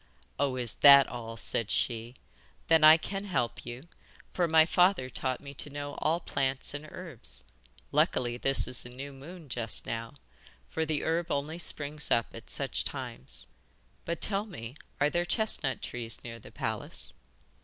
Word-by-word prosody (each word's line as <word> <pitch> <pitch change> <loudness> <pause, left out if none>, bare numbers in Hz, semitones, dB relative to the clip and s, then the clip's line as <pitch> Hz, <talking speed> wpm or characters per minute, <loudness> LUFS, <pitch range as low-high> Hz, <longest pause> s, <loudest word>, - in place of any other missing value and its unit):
'Oh, 140 -2 +1
is 125 -3 0
that 140 -1 +10
all,' 115 -2 -7
said 110 +1 0
she, 115 +1 -1 0.5
'then 160 -1 +5
I 155 +1 +10
can 195 +4 -5
help 170 -12 -1
you, 120 +3 -7 0.5
for 175 -2 +1
my 160 -1 +6
father 180 -7 +3
taught 130 -1 -2
me 140 -1 -9
to 145 - -6
know 145 0 -5
all 165 +2 +1
plants 135 -5 0
and 145 +1 -6
herbs. 130 - -9 0.5
Luckily 120 -1 +2
this 135 +2 +2
is 125 - +6
a 120 - -9
new 135 +3 -8
moon 155 +4 -11
just 115 -4 -3
now, 115 +3 -5 0.5
for 160 - -2
the 150 -2 -1
herb 165 +1 0
only 150 +4 -2
springs 150 -2 0
up 115 -2 +1
at - - -11
such - - -1
times. 65 -1 -5 0.6
But 170 0 -4
tell 205 +1 0
me, 115 - -8 0.2
are 145 +1 +3
there 175 - +1
chestnut 175 - +1
trees 115 -2 -5
near 115 -1 -8
the - - -14
palace? - - -3
140 Hz, 165 wpm, -30 LUFS, 120-160 Hz, 0.6 s, that